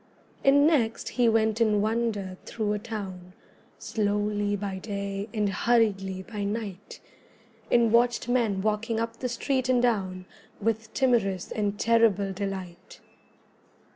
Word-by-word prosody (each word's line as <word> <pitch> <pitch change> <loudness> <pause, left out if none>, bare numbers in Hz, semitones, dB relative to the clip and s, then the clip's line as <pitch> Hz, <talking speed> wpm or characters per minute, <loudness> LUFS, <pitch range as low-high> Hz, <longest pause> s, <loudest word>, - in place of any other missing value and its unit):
And 285 +1 +6
next 245 -8 +1
he 245 -2 +2
went 220 0 +2
in 215 -2 +3
wonder 215 -3 -1
through 215 -2 -1
a 210 - -2
town 195 -5 -7 0.4
Slowly 205 -1 -1
by 195 -1 -4
day 200 0 -4
and 210 -2 0
hurriedly 195 -3 +1
by 210 0 -5
night, 205 -2 -5 0.7
And 235 -2 +4
watched 240 0 +3
men 225 -6 +1
walking 220 +1 0
up 230 0 -3
the 250 - -2
street 255 +2 -1
and 250 -1 +4
down 190 -7 0 0.3
With 220 +1 -1
timorous 220 -8 +1
and 205 -1 -2
terrible 220 -4 +3
delight. 190 -3 -6
215 Hz, 130 wpm, -27 LUFS, 200-230 Hz, 0.7 s, And